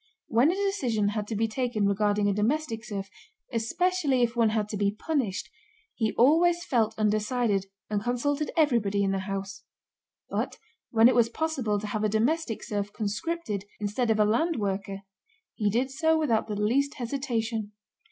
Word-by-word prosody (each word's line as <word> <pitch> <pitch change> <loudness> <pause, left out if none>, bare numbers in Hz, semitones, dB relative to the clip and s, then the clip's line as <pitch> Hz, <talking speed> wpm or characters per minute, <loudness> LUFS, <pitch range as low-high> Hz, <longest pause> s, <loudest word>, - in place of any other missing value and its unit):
When 240 +7 +4
a 355 - +1
decision 265 - 0
had 210 0 -3
to 220 - -3
be 225 +2 +1
taken 230 -2 -1
regarding 205 +1 +2
a 200 - +2
domestic 230 +3 -1
serf, 200 -3 -5 0.5
especially 280 +3 +1
if 235 0 0
one 230 -2 +4
had 215 -1 0
to 210 - -4
be 200 0 +2
punished, 250 - -2 0.4
he 220 -2 0
always 340 +7 +4
felt 225 -3 +1
undecided 215 -1 +1 0.2
and 210 -1 -1
consulted 280 +6 -1
everybody 230 -10 +2
in 195 - +1
the 195 - 0
house; 195 0 -5 0.7
but - - -3 0.3
when 225 0 +6
it 255 - +4
was 235 -1 +4
possible 255 -7 -1
to 210 - -6
have 210 0 -2
a 215 - +2
domestic 235 +4 0
serf 205 -1 -3
conscripted 210 - -3
instead 215 +4 -1
of 220 -1 +2
a 210 - +5
land 285 +11 +1
worker 195 -2 -3 0.5
he 210 -2 0
did 250 +6 0
so 320 +3 +2
without 235 -9 +1
the 210 - -3
least 270 +7 +1
hesitation. 230 -4 -2
225 Hz, 170 wpm, -27 LUFS, 210-270 Hz, 0.7 s, when